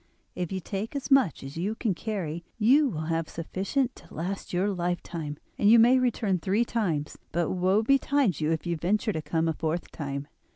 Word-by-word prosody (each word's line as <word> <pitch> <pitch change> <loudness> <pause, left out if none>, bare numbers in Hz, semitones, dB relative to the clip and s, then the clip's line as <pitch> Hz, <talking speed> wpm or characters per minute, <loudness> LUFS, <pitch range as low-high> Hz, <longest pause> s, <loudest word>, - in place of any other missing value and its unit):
If 180 -2 -4
you 190 - -2
take 200 +7 -5
as 280 0 -4
much 260 - +4
as 135 +3 -8
you 200 +6 -1
can 225 -4 0
carry 175 -5 -4
you 265 +7 +5
will 155 -8 -4
have 165 0 -1
sufficient 200 - -2
to - - -16
last 185 +5 -4
your 185 +3 +1
lifetime, 170 -4 -3 0.2
and 205 - +5
you 230 - +8
may 245 +3 +6
return 220 -7 +1
three 200 +7 +1
times; 170 -12 -2
but 170 -1 0
woe 190 +4 +2
betide 275 - +2
you 155 +1 +1
if 160 +1 -1
you 170 -1 -1
venture 210 +6 0
to 160 - -2
come 160 +2 0
a 160 - +1
fourth 160 +2 -3
time. 140 -1 -5
185 Hz, 200 wpm, -27 LUFS, 165-225 Hz, 0.2 s, you